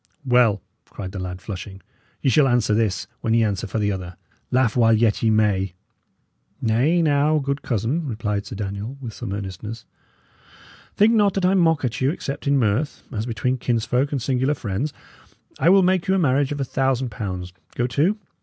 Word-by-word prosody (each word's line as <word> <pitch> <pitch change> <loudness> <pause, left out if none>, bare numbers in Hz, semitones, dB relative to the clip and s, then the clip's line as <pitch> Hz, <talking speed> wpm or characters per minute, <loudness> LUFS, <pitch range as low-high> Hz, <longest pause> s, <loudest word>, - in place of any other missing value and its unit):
"Well," 120 -6 +3 0.2
cried 95 -2 -8
the 100 - -6
lad, 90 0 -6
flushing, 95 -1 -7 0.4
"ye 135 - +3
shall 150 -1 +5
answer 120 -4 +2
this 105 -5 0
when 115 0 0
ye 115 - +4
answer 100 -2 -1
for - - -4
the 105 -1 +1
other. 90 -2 -5 0.3
Laugh 125 -3 +2
while 115 -2 +5
yet 110 -1 +2
ye 115 - +3
may!" 100 -4 +1 0.8
"Nay, 130 +10 +2
now, 150 0 +3
good 140 -1 -2
cousin," 130 - -1
replied 105 -4 -2
Sir - - -7
Daniel, 100 +5 -5
with 120 -5 -7
some 95 - -6
earnestness, 100 +3 -6 1.1
"think 215 +3 +5
not 205 -3 +3
that 195 -2 +1
I 185 - +4
mock 165 -6 +3
at 125 +1 -3
you, 130 - +3
except 145 -2 -4
in 140 0 +4
mirth, 120 +4 0
as 110 -1 -3
between 125 +2 -1
kinsfolk 125 +4 0
and 140 - -1
singular 130 +3 0
friends. 120 +6 -3 0.7
I 160 - +4
will 195 +1 +6
make 185 +1 +2
you 190 - +3
a - - +2
marriage 140 -4 +2
of 145 - -3
a 135 - 0
thousand 130 -1 0
pounds, 90 -5 -5 0.2
go 120 - 0
to! 150 - +1
120 Hz, 190 wpm, -22 LUFS, 105-145 Hz, 1.1 s, will